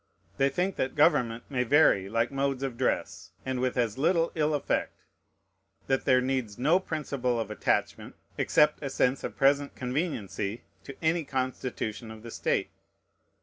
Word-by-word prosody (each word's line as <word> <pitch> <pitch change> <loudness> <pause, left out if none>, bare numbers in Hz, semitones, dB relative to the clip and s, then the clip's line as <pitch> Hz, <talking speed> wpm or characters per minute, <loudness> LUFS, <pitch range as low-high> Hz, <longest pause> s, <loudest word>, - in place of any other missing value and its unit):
They 135 0 +3
think 180 +7 -1
that 130 - -1
government 125 -7 +3
may 130 -3 0
vary 125 -8 +4
like 115 +3 0
modes 135 -1 -1
of 135 -3 -3
dress, 130 +1 -2 0.2
and 130 -1 -2
with 130 0 -1
as 120 -1 0
little 165 +2 +2
ill 155 -1 +1
effect; 145 - -1 0.9
that 135 0 0
there 130 -1 +5
needs 130 -5 -2
no 155 +9 +3
principle 140 -8 -2
of 110 -2 -3
attachment, 105 - -1 0.2
except 150 0 +3
a 140 - -3
sense 130 0 +1
of - - -5
present 140 +1 +2
conveniency, 125 - -3 0.2
to 140 - -8
any 165 +1 +2
constitution 130 -4 -3
of 110 0 -10
the 115 - -8
state. - - -1
130 Hz, 155 wpm, -28 LUFS, 120-145 Hz, 0.9 s, there